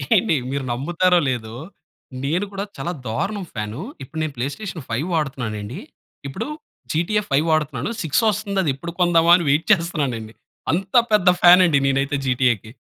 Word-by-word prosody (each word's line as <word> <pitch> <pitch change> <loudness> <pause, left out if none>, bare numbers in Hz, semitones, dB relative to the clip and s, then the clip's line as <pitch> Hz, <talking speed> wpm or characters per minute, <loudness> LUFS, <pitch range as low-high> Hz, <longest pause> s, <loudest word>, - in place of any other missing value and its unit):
ఏండి, 215 -8 +3 0.2
మీరు 140 0 -2
నమ్ముతారో 175 +7 +2
లేదో 115 -3 -4 0.7
నేను 165 +8 0
కూడా 195 0 -4
చాలా 175 - -3 0.2
దారుణం 195 - -2
ఫ్యాను, 110 +4 -5 0.2
ఇప్పుడు 150 +5 -7
నేను 155 -2 -3
ప్లే 120 +1 -2
స్టేషన్ 185 -8 -7
ఫైవ్ 125 +9 -2
వాడుతున్నానండి. 125 - -3 0.5
ఇప్పుడు 135 - -5 0.4
జీటీఏ 175 +7 +1
ఫైవ్ 140 +3 +2
వాడుతున్నాను. 150 - 0
6 160 -3 +1
వస్తుంది, 205 -1 -3
అది 155 - 0
ఎప్పుడు 170 +5 -7
కొందాం 170 -2 +4
అని 175 -2 0
వెయిట్ 150 +4 +2
చేస్తున్నానండి. 145 - 0 0.4
అంత 190 +5 -2 0.2
పెద్ద 200 -4 +5
ఫ్యాన్ 180 +1 +8
అండి 155 -5 +3
నేనైతే, 135 +1 0
జీటీఏకి. 120 -4 +1
155 Hz, 155 wpm, -21 LUFS, 130-180 Hz, 0.7 s, ఫ్యాన్